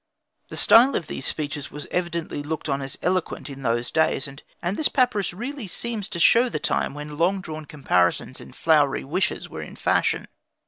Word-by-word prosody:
The - - -7
style 250 +4 +6
of 170 - -1
these 135 - -4
speeches 150 -2 -3
was 150 - -7
evidently 170 -4 -2
looked 155 +2 -4
on 140 -1 0
as 135 0 -6
eloquent 180 -5 -1
in 135 0 -9
those 120 -1 0
days, 160 -2 +2
and 140 +1 -11 0.3
this 310 - +2
papyrus 250 -7 +2
really 240 +5 -5
seems 220 +1 -4
to 170 - -4
show 235 +8 +6
the - - -2
time - - 0
when 150 0 -7
long 185 +4 +3
drawn 155 -4 -7
comparisons 130 -5 +1
and - - -13
flowery 150 -4 +3
wishes 185 +7 -1
were - - -7
in - - -9
fashion. - - +1
160 Hz, 185 wpm, -24 LUFS, 145-195 Hz, 0.3 s, style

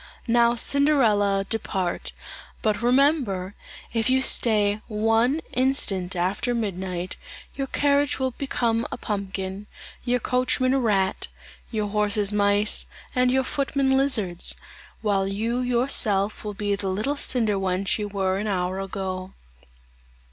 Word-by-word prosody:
"Now 235 0 +4
Cinderella, 225 -8 +3
depart; 190 -5 -2 0.5
but 215 -1 0
remember, 245 - +2 0.4
if 225 +1 0
you 260 +1 +3
stay 210 -4 +2
one 225 +7 +1
instant 200 -9 +2
after 190 +7 0
midnight, 185 -4 -3 0.4
your 275 -1 -3
carriage 285 +1 +1
will 260 -1 -1
become 235 -3 -1
a - - -4
pumpkin, 195 -1 -4 0.4
your 245 0 +1
coachman 255 +1 +1
a 270 - +2
rat, 195 -6 0 0.4
your 215 -3 -2
horses 210 0 +2
mice, 205 0 +2 0.3
and 250 -1 +2
your 265 +1 +2
footmen 275 0 0
lizards; 220 -11 +1 0.5
while 195 -2 +1
you 225 +5 -2
yourself 235 -5 +1
will 210 -1 -5
be 205 0 -1
the 200 -1 -2
little 215 +10 -1
cinder 230 -7 +1
wench 190 +2 0
you 210 - -2
were 195 -1 -1
an 210 - -3
hour 185 -1 -1
ago." 190 -1 -5
215 Hz, 125 wpm, -24 LUFS, 195-250 Hz, 0.5 s, Now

